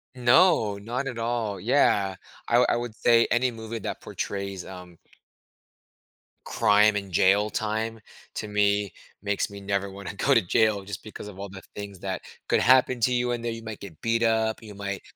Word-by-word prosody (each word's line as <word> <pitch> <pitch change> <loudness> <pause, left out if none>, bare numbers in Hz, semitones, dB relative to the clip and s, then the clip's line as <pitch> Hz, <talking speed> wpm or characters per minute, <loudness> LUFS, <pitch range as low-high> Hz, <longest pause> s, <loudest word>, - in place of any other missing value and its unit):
No. 125 - +4
Not 120 +7 -4
at 125 -3 -5
all. 115 -4 -2
Yeah. 100 -4 +2 0.3
I 120 - +4
wou 125 - +5
I - - +2
would 120 -2 -4
say 115 0 +4
any 125 +1 +3
movie 115 0 -6
that - - -5
portrays, 100 -2 -5
um 90 -2 -11 1.5
crime 105 +1 +4
and 100 -2 -5
jail 100 +5 +3
time 110 +1 -2 0.4
to - - -4
me 105 -2 +1 0.3
makes 100 0 -1
me 100 0 -10
never 100 0 -1
wanna 100 +1 -8
go 100 - +2
to 115 - +5
jail 105 +2 +2
just 100 0 -7
because 110 -1 -9
of 95 -2 -12
all 100 0 -6
the 95 0 -10
things 100 -2 -7
that 95 -1 -4 0.3
could - - +3
happen 130 -1 +4
to 125 +3 +3
you 125 0 +1
in 120 - -2
there. 115 0 -2
You 115 0 -7
might 110 -2 -7
get 90 -6 -11
beat 115 0 +1
up. 110 -1 +1
You 105 -2 -11
might 100 -1 -4
105 Hz, 190 wpm, -26 LUFS, 100-115 Hz, 1.5 s, wou